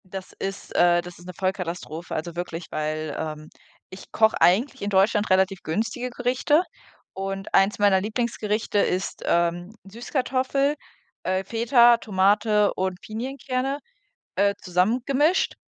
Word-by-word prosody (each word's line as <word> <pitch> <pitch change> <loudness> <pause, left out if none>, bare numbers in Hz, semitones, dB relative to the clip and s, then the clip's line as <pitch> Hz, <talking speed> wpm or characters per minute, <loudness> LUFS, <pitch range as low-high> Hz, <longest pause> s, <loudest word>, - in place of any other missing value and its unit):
Das 190 0 -8
ist 195 0 -6
äh, 175 0 +4
das 175 0 -11
ist 175 - -14
'ne 180 - -7
Vollkatastrophe, 180 -3 -4
also 170 +2 -4
wirklich, 175 -1 -5
weil, 155 -1 -3
ähm, 155 -1 -5 0.4
ich 185 - -12
koche 220 0 +3
eigentlich 250 +9 +3
in 205 - -2
Deutschland 205 +2 +2
relativ 190 0 +2
günstige 225 +8 -2
Gerichte 250 +6 +1 0.5
und 195 0 -5
eins 195 +2 +4
meiner 200 -2 +4
Lieblingsgerichte 215 -1 -1
ist, 185 -1 -1
ähm, 175 +4 0
Süßkartoffel, 260 +6 -1 0.5
äh, 185 +1 0
Feta, 235 +3 +4
Tomate 210 0 +2
und 185 -1 -2
Pinienkerne, 260 +3 -3 0.6
äh, 200 +1 +3
zusammengemischt. 250 - +1
195 Hz, 125 wpm, -24 LUFS, 180-235 Hz, 0.6 s, äh